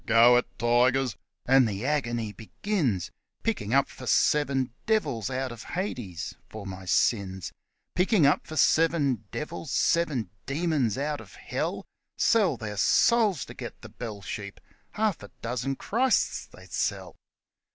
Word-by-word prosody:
' - - -35
Go 120 +2 +8
it, 125 - +1
tigers! 120 +1 +3 0.2
' - - -56
and 130 -1 +6
the 105 +2 -3
agony 120 -7 -1
begins, 115 - -2 0.3
Picking 205 - -1
up 140 +1 +4
for 130 - -10
seven 135 -3 +2 0.2
devils 145 - +1
out 130 0 -2
of 120 -1 -8
Hades 120 - -4 0.2
for 110 -2 -8
my 95 -1 -7
sins; 95 -1 +1 0.4
Picking 180 -2 +3
up 140 - +3
for 155 - -7
seven 150 - +3
devils, 160 0 -5
seven 135 - +1 0.2
demons 145 - 0
out 145 +1 -2
of - - -14
Hell! - - -3 0.3
Sell 215 -6 +3
their 105 -3 -6
souls 210 - +3
to - - -10
get - - -8
the - - -9
bell 110 -5 -7
sheep 100 +2 -6 0.3
half 215 -4 0
a 100 - -10
dozen 125 +3 -2
Christs 250 - +1
they'd - - -16
sell - - -2
130 Hz, 150 wpm, -27 LUFS, 110-155 Hz, 0.4 s, Go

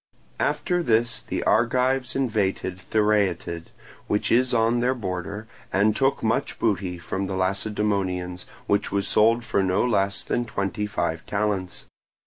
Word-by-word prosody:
After 180 -2 0
this 115 -5 +1
the - - -3
Argives 125 +3 +2
invaded 105 -7 -1
the - - -16
Thyreatid, 95 -6 +1 0.4
which 105 - 0
is 125 +2 +4
on 115 0 +2
their 125 +2 +1
border, 100 0 -5 0.2
and 105 +2 +3
took 135 0 +1
much 110 0 0
booty 95 -5 0
from 95 +3 -3
the 95 - -3
Lacedaemonians, 95 -2 -1 0.2
which 100 0 +1
was 100 -1 0
sold 115 +2 +4
for 100 - +1
no 95 +4 +2
less 100 -4 +1
than 120 - -1
twenty 105 -1 -2
five 85 -5 -2
talents. 100 -3 -2
105 Hz, 140 wpm, -25 LUFS, 95-115 Hz, 0.4 s, is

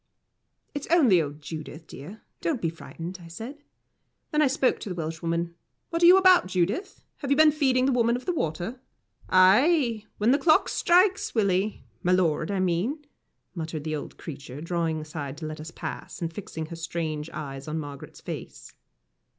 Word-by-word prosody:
"It's 290 - -5
only 260 - +5
old 145 0 -6
Judith, 155 +1 -7
dear 175 +12 -10 0.2
don't 310 -7 0
be 165 -5 -1
frightened," 170 +2 -8
I 170 - -11
said. 225 - -8 0.7
Then 300 - +2
I 300 - +5
spoke 265 -1 +2
to - - -6
the 180 - -4
Welshwoman: 165 +1 -2 0.4
"What 335 0 -1
are 340 - +8
you 365 +2 +9
about, 370 - +6
Judith? 195 - -1
Have 280 - -5
you 280 - +3
been 310 0 +7
feeding 265 -4 +2
the 270 - +3
Woman 235 -1 +3
of 250 - -5
the 360 - 0
Water?" 175 - -3 0.5
"Ay 225 - +4
when 215 +4 +3
the 280 - +4
clock 310 +1 +4
strikes, 365 -1 +3
Willie 200 -1 +1 0.2
my 180 - +2
lord, 165 -4 +2
I 200 -1 -1
mean," 185 - 0 0.5
muttered 160 -3 -4
the 155 0 -2
old 150 - -7
creature, 140 -3 -8
drawing 165 -1 -1
aside 150 -2 -6
to 155 - -6
let 155 0 -6
us 155 - -7
pass, - - -7
and 165 -1 -3
fixing 165 -5 -6
her 165 +2 -8
strange 165 -2 -3
eyes 135 -2 -7
on 155 +1 -2
Margaret's 145 -3 -8
face. - - -8
180 Hz, 180 wpm, -26 LUFS, 160-260 Hz, 0.7 s, you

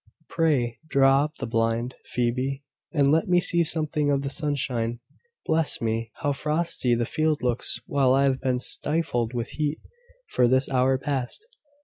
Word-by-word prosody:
"Pray, 140 -8 0
draw 135 -1 +4
up 150 - -8
the - - -4
blind, 115 +2 -1
Phoebe, 130 +3 -2 0.3
and 145 -4 +3
let 160 +1 +2
me 180 -1 +4
see 170 -1 +2
something 155 -2 +1
of 140 -1 +1
the 140 - -3
sunshine. 130 -6 -1 0.5
Bless 160 -1 +2
me! 115 0 -2
how 145 - +2
frosty 150 -3 0
the 120 0 0
field 155 +1 -1
looks, 125 -1 +1
while 140 -7 +2
I 135 - +3
have 135 -1 +1
been 130 -1 0
stifled 130 -4 -1
with 120 0 -3
heat 150 0 -2 0.5
for 125 - +2
this 130 +2 +2
hour 130 0 +2
past! 135 - -3
135 Hz, 160 wpm, -25 LUFS, 125-150 Hz, 0.5 s, draw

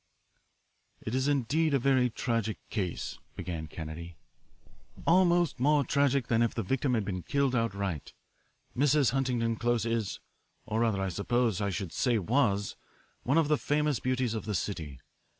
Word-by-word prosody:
"It 110 - -3
is 130 +1 +1
indeed 145 +3 +2
a - - +5
very 130 -1 +3
tragic 115 -2 -1
case," 95 -6 -3 0.2
began 80 -3 -5
Kennedy, 80 +2 -7 0.9
"almost 175 -3 +3
more 145 +2 +4
tragic 140 -1 +2
than 115 -1 +2
if 115 - +1
the 115 - -1
victim 130 +4 0
had 110 -3 0
been 90 -2 -3
killed 140 +4 0
outright. 100 - -2 0.6
Mrs. 140 -1 +3
Huntington 120 -4 0
Close 120 0 +1
is 115 -3 -1 0.5
or 110 - -1
rather 110 -4 +1
I 95 - -1
suppose 110 +2 0
I 100 - 0
should 95 -2 -4
say 125 -3 +2
was 105 -1 +1 0.5
one 135 +5 +1
of 165 -3 +4
the 150 -1 +2
famous 150 -2 +1
beauties 130 -2 0
of 110 - -4
the 105 -2 -2
city. 80 -7 -4
115 Hz, 155 wpm, -30 LUFS, 100-135 Hz, 0.9 s, a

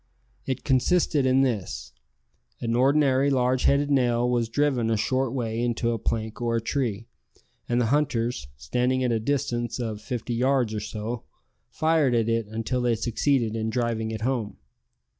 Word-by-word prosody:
It 130 -2 -2
consisted 140 +1 +2
in 130 +1 +4
this: 90 - -3 0.7
an 115 -1 -1
ordinary 135 +1 +3
large 130 -1 +1
headed 145 +1 +3
nail 120 -3 +2
was 120 -2 0
driven 130 -3 +1
a 110 - +2
short 130 +3 0
way 115 -3 -2
into 120 0 0
a 115 - -2
plank 110 +1 -3
or 115 -1 0
a - - +2
tree, 115 -3 -2 0.6
and 120 0 +2
the 120 - +2
hunters, 120 - 0
standing 125 - 0
at 125 - +1
a 115 - +1
distance 120 -1 -1
of 110 -3 -4
fifty 125 -1 -4
yards 125 -1 +1
or 105 - -2
so, 110 +3 -5 0.4
fired 155 -5 +2
at 115 -1 +1
it 115 -2 0
until 115 +4 -2
they 120 -1 +2
succeeded 115 0 0
in 110 0 -1
driving 115 -1 -1
it 110 0 -5
home. 115 -4 -2
120 Hz, 165 wpm, -25 LUFS, 115-130 Hz, 0.7 s, in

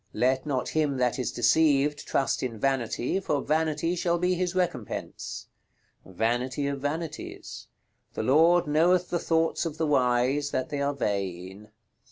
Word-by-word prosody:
"Let 130 +3 +1
not 130 -4 -1
him 150 -3 0
that 125 0 0
is 125 - -1
deceived 145 +2 +2
trust 135 -3 0
in 120 -3 -3
Vanity, 130 - 0
for 150 -6 -1
Vanity 160 +2 0
shall 170 0 0
be 180 +1 +1
his 180 0 -2
recompense." 170 - -3 0.6
"Vanity 120 +8 -1
of 140 -1 -3
Vanities." 155 +2 -5 0.5
"The - - -2
Lord 165 +6 +4
knoweth 170 +4 +2
the 175 - +1
thoughts 165 0 +1
of 160 -3 -4
the 160 - 0
wise, 130 0 +2
that 130 - -2
they 145 -1 -3
are 140 0 0
vain." 100 -3 -4
145 Hz, 150 wpm, -27 LUFS, 125-160 Hz, 0.6 s, Lord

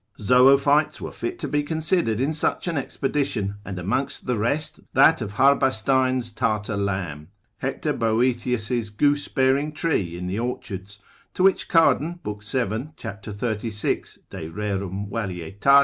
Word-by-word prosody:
Zoophytes 135 +6 +4
were - - -6
fit 355 0 -4
to - - -4
be 145 - +1
considered 160 - 0
in 140 +4 +1
such 160 - 0
an 170 - -1
expedition, 135 -7 -1
and 100 -2 -6
amongst 120 +10 -2
the 125 - 0
rest 120 +8 -1
that 160 -4 +5
of 105 -2 -4
Harbastein 130 0 +3
his 120 -2 -3
Tartar 110 -2 -1
lamb, 95 -7 -3 0.3
Hector - - -2
Boethius 115 0 0 0.2
goosebearing 145 +3 +1
tree 100 - -1
in 90 - -5
the 95 +4 -2
orchards, 105 -4 -5 0.4
to 185 - +1
which 195 0 +3
Cardan 165 +1 +3
lib. 105 0 -4
7. 120 +5 -2
cap. 100 +2 -7
36. 105 0 -3
de 80 - -6
rerum 100 +1 -3
varietat. 100 +5 +2
115 Hz, 140 wpm, -24 LUFS, 100-140 Hz, 0.4 s, that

